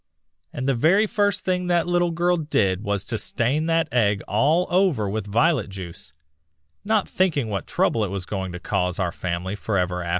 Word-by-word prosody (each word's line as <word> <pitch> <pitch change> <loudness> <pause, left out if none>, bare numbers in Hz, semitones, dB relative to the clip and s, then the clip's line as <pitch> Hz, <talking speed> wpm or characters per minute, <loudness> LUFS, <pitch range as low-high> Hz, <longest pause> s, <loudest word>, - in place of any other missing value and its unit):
And 130 - -4
the 135 - +3
very 170 - +3
first 205 -1 0
thing 180 -1 0
that 175 -1 +2
little 175 0 +1
girl 175 +1 +1
did 105 - 0
was 100 -2 -1
to 110 +1 -3
stain 140 +7 0
that 165 -1 +2
egg 105 -5 +2
all 150 +11 +2
over 175 - +2
with 105 +1 -3
violet 125 +2 +2
juice, 90 -6 -9 0.7
not 215 -1 +1
thinking 155 -11 0
what 100 -3 -3
trouble 115 - +1
it 100 - -2
was 95 -1 -4
going 95 -1 -4
to 90 - -6
cause 90 0 -1
our 90 -3 -1
family 90 +3 -3
forever 90 -4 -1
after." 85 - -5
115 Hz, 190 wpm, -23 LUFS, -, 0.7 s, the